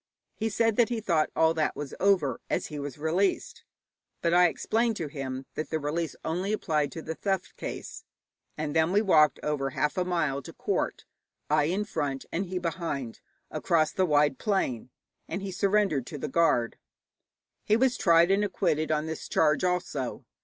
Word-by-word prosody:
He 225 +1 -2
said 225 -1 +1
that 240 -2 +4
he 235 -2 -1
thought 170 -8 +1
all 160 0 +4
that 155 -2 0
was 145 -2 -6
over, 180 -11 +2
as - - 0
he 150 - -6
was 140 -1 -6
released; 190 - 0 0.6
but 170 0 +2
I 180 0 +7
explained 225 +6 0
to 165 - -3
him 135 -2 -5
that 155 - -4
the 160 - 0
release 155 +1 -2
only 180 +6 -1
applied 155 -8 0
to 165 - -7
the 160 - -4
theft 190 +2 -2
case. - - -7 0.5
And 150 -1 -3
then 160 +1 +3
we 205 +3 +3
walked 155 -7 +4
over 145 -2 -1
half 150 +4 -1
a - - +2
mile 160 -6 0
to - - -10
court, - - -2 0.5
I 150 -1 +4
in 190 +6 0
front 140 -8 -3
and 185 +3 -2
he 185 +1 -3
behind, 165 -8 -3 0.3
across 155 -2 +1
the 185 -1 +1
wide 145 -3 +3
plain, 130 - -1 0.4
and 195 - -4
he 195 - -4
surrendered 195 - +1
to 150 - -6
the 150 - -4
guard. 130 -6 +2 0.8
He 215 - +3
was 255 0 +3
tried 170 -2 +4
and 200 +1 +3
acquitted 155 -5 0
on 155 0 +1
this 160 -1 -6
charge 150 0 +2
also. 180 -8 -2
165 Hz, 180 wpm, -28 LUFS, 150-190 Hz, 0.8 s, I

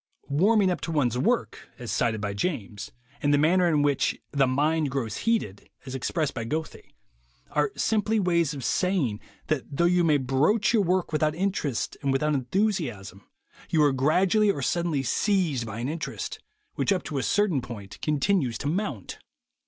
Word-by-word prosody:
"Warming 190 +6 +3
up 180 - -3
to 165 - -4
one's 130 -7 +1
work," 230 - -1
as 120 -4 -6
cited 115 -3 0
by 100 -1 -2
James, 105 - -4 0.3
and 145 - +2
the 145 - +4
manner 175 +5 +3
in 150 -4 +2
which 145 -1 +1
"the 140 -2 +2
mind 150 +3 +1
grows 125 -6 -3
heated," 105 - -1 0.2
as 130 - -7
expressed 145 +3 -1
by 115 - -4
Goethe, 155 +7 -4 0.6
are 150 +5 +1
simply 220 0 +1
ways 170 -5 +1
of 135 - -6
saying 160 - 0 0.3
that 155 -4 -1
though 170 - +3
you 175 0 +3
may 155 -3 +4
broach 145 - +2
your 220 - +4
work 185 -1 0
without 155 0 +1
interest 175 - -2
and 140 -1 0
without 150 +3 +1
enthusiasm, 130 - -2 0.4
you 155 -2 +3
are 145 -2 +4
gradually 180 +10 +3
or 145 -9 0
suddenly 170 -5 0
seized 160 - 0
by 110 0 -6
an 120 +2 -3
interest, 155 +2 -5 0.3
which - - 0
up 185 -3 +1
to 145 -3 -3
a - - -1
certain 195 -4 +1
point 105 -5 -9
continues 150 - +1
to 140 - -4
mount. 150 - -3
150 Hz, 175 wpm, -26 LUFS, 130-180 Hz, 0.6 s, the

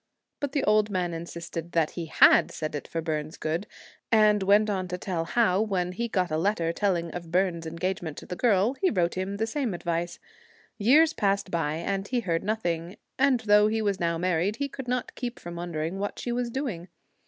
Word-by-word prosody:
But 285 -2 -3
the 280 - +1
old 215 0 +3
man 180 -3 -1
insisted 170 0 -6
that 165 -2 +2
he 170 -2 -5
had - - +6
said 155 -1 -5
it 145 - -5
for 165 - -3
Byrne's 155 -1 -3
good; 165 +6 -2 0.4
and 215 -2 +5
went 205 +3 +4
on 190 -3 -1
to 180 0 -4
tell 175 -3 -3
how, 205 -1 +2
when 185 -5 -1
he 235 +6 -2
got 185 -6 0
a 155 - +1
letter 170 -3 0
telling 175 -4 0
of 170 -1 -7
Byrne's 175 -2 0
engagement 170 -1 -3
to - - -8
the 180 - -5
girl, 215 +1 +3
he 380 - +4
wrote 175 -4 +1
him 190 +2 -3
the 220 - 0
same 230 -4 -2
advice. 170 0 -2 0.6
Years 300 +9 +5
passed 200 -4 0
by, 155 -3 0
and 195 +4 -2
he 245 +1 0
heard 165 -6 -1
nothing; 175 -4 -2 0.2
and 265 -3 +4
though 210 -1 +5
he 220 +1 0
was 200 -2 0
now 170 -1 0
married, 180 +3 0
he 280 +3 -2
could 265 -2 -8
not 250 0 -2
keep 245 -1 -5
from 175 0 -8
wondering 170 +1 -3
what 205 +1 -3
she 240 - -3
was 240 0 -1
doing. 230 - -4
185 Hz, 210 wpm, -27 LUFS, 170-215 Hz, 0.6 s, had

